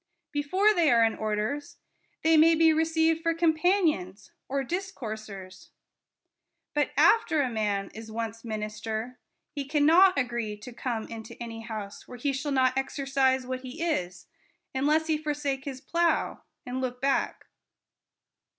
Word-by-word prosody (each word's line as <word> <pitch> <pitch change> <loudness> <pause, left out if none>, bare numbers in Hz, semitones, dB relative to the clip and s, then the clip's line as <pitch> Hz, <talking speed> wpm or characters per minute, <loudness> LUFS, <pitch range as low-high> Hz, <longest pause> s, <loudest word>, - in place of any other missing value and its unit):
Before 370 +9 +2
they 340 -6 +3
are 235 -3 +5
in 225 -1 +3
orders, 215 +7 -3 0.5
they 320 0 +5
may 325 +1 +6
be 320 0 +5
received 320 0 +2
for 330 0 +1
companions, 315 - +1 0.2
or 275 +1 0
discoursers; 215 - -6 1.1
but 295 0 +1
after 325 -10 +4
a 255 - -2
man 205 -3 -1
is 220 0 -9
once 225 0 -4
minister, 220 +2 -4 0.3
he 285 -2 -4
cannot 315 +6 +5
agree 235 -5 -2
to 225 +4 -10
come 235 -2 -3
into 225 -1 -8
any 230 -1 -6
house 215 -3 -7
where 250 - -9
he 275 +3 -1
shall 270 +2 -3
not 260 -1 +3
exercise 270 -1 +1
what 255 0 -3
he 265 +6 -6
is, 180 - -2 0.5
unless 300 +4 +2
he 315 -1 0
forsake 290 -3 -2
his 265 -2 -6
plough 335 +3 0 0.2
and 250 +1 -3
look 250 -1 -3
back. 275 +1 0
265 Hz, 140 wpm, -28 LUFS, 225-315 Hz, 1.1 s, may